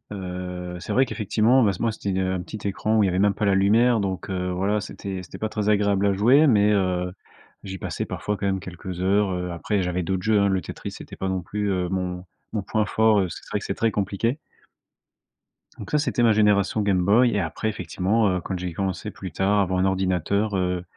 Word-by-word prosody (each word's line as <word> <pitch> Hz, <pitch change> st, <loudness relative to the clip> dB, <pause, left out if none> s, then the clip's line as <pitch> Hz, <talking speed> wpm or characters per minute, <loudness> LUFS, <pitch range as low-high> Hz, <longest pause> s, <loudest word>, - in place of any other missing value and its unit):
heu, 90 Hz, -1 st, -6 dB
c'est -, -, -4 dB
vrai 130 Hz, -, +4 dB
qu'effectivement, 115 Hz, +3 st, +2 dB
ben, 100 Hz, -3 st, +3 dB
ce -, -, -8 dB
moi, 115 Hz, -, +1 dB
c'était 100 Hz, -3 st, -3 dB
un 95 Hz, -1 st, -1 dB
petit 100 Hz, +4 st, -9 dB
écran 110 Hz, +3 st, 0 dB
où 105 Hz, -, +4 dB
il -, -, +3 dB
y -, -, +1 dB
avait 90 Hz, -, 0 dB
même 100 Hz, 0 st, +3 dB
pas 105 Hz, -, -2 dB
la 100 Hz, -, +3 dB
lumière, 110 Hz, +5 st, +4 dB
donc, 95 Hz, -1 st, -3 dB
heu, 90 Hz, -1 st, -2 dB
voilà, 100 Hz, +4 st, 0 dB
c'était 95 Hz, -2 st, -6 dB
c'était -, -, -10 dB
pas 110 Hz, -, -2 dB
très 105 Hz, -1 st, -2 dB
agréable 100 Hz, -1 st, +2 dB
à 100 Hz, -, +2 dB
jouer, 125 Hz, +10 st, +5 dB
mais, 105 Hz, -4 st, +4 dB
heu, 90 Hz, -2 st, 0 dB, 0.5 s
j'y 95 Hz, -1 st, -6 dB
passais -, -, -4 dB
parfois 105 Hz, -1 st, -3 dB
quand 100 Hz, -, -4 dB
même 95 Hz, -1 st, 0 dB
quelques 90 Hz, 0 st, -7 dB
heures. 100 Hz, +1 st, +2 dB
Heu, 90 Hz, 0 st, -3 dB
après, 95 Hz, +4 st, -1 dB
j'avais 90 Hz, 0 st, -1 dB
d'autres 90 Hz, +1 st, -2 dB
jeux, 110 Hz, -1 st, +3 dB
hein. 100 Hz, -, +3 dB
Le 95 Hz, -1 st, +1 dB
Tetris, -, -, -7 dB
c'était -, -, -10 dB
pas 95 Hz, -, -3 dB
non 95 Hz, -1 st, -1 dB
plus, 100 Hz, +3 st, -2 dB
heu, 90 Hz, -1 st, -1 dB
mon 90 Hz, -1 st, -3 dB, 0.3 s
mon 105 Hz, -, -1 dB
point 110 Hz, +2 st, 0 dB
fort, 110 Hz, 0 st, +3 dB
parce 95 Hz, -4 st, -1 dB
que -, -, -10 dB
c'est -, -, -15 dB
vrai -, -, 0 dB
que -, -, -9 dB
c'est -, -, -2 dB
très 115 Hz, -1 st, +1 dB
compliqué. 105 Hz, +7 st, -1 dB, 1.4 s
Donc, -, -, -9 dB
ça, 150 Hz, -, +3 dB
c'était 135 Hz, -5 st, 0 dB
ma 115 Hz, -, +5 dB
génération 105 Hz, 0 st, +3 dB
Game 95 Hz, -3 st, +2 dB
Boy, 115 Hz, +5 st, +5 dB
et -, -, +2 dB
après, 80 Hz, +5 st, -2 dB
effectivement, 95 Hz, +3 st, 0 dB
heu, 90 Hz, -1 st, -1 dB
quand 95 Hz, +2 st, -4 dB
j'ai 90 Hz, -1 st, -4 dB
commencé 95 Hz, 0 st, -3 dB
plus -, -, -8 dB
tard 100 Hz, +2 st, +1 dB
à -, -, +5 dB
avoir 95 Hz, -1 st, 0 dB
un 95 Hz, -, +2 dB
ordinateur, 95 Hz, +2 st, 0 dB
heu, 90 Hz, -1 st, -1 dB
100 Hz, 240 wpm, -24 LUFS, 90-105 Hz, 1.4 s, jouer